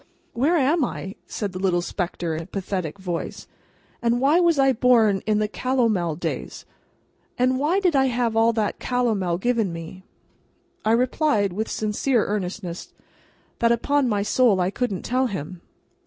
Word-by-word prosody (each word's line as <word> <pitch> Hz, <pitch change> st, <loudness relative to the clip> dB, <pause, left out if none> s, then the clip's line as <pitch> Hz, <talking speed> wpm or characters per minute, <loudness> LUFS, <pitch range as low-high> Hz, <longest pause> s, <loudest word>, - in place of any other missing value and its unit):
"Where 285 Hz, +9 st, +2 dB
am 295 Hz, +3 st, +2 dB
I?" 195 Hz, -5 st, -4 dB
said 205 Hz, -3 st, -4 dB
the 185 Hz, -, -6 dB
little 180 Hz, -2 st, +1 dB
spectre, 175 Hz, -2 st, -3 dB
in 160 Hz, -, -3 dB
a -, -, -8 dB
pathetic 190 Hz, -4 st, -4 dB
voice. 180 Hz, -3 st, -5 dB, 0.6 s
"And 235 Hz, 0 st, +1 dB
why 285 Hz, +6 st, +4 dB
was 340 Hz, -3 st, +3 dB
I 270 Hz, -1 st, +4 dB
born 225 Hz, -5 st, +3 dB
in 215 Hz, -1 st, +2 dB
the 210 Hz, 0 st, +1 dB
Calomel 220 Hz, -9 st, 0 dB
days, 170 Hz, -, -5 dB, 0.7 s
and 255 Hz, +1 st, +2 dB
why 320 Hz, +7 st, +2 dB
did 360 Hz, -6 st, +1 dB
I 265 Hz, -1 st, +4 dB
have 240 Hz, -2 st, 0 dB
all 225 Hz, +1 st, +4 dB
that 215 Hz, -2 st, -1 dB
Calomel 220 Hz, -9 st, 0 dB
given 225 Hz, -1 st, 0 dB
me?" 165 Hz, +2 st, -8 dB, 0.8 s
I 220 Hz, -, +2 dB
replied, 245 Hz, -, +1 dB
with 220 Hz, +4 st, -3 dB
sincere 220 Hz, +3 st, 0 dB
earnestness, 185 Hz, -3 st, -4 dB, 0.7 s
that 230 Hz, 0 st, +3 dB
upon 265 Hz, +3 st, +1 dB
my 205 Hz, -2 st, 0 dB
soul 220 Hz, -2 st, +3 dB
I 180 Hz, +1 st, +1 dB
couldn't 210 Hz, -5 st, -2 dB
tell 255 Hz, +1 st, +1 dB
him. 180 Hz, -4 st, -6 dB
220 Hz, 160 wpm, -23 LUFS, 190-255 Hz, 0.8 s, why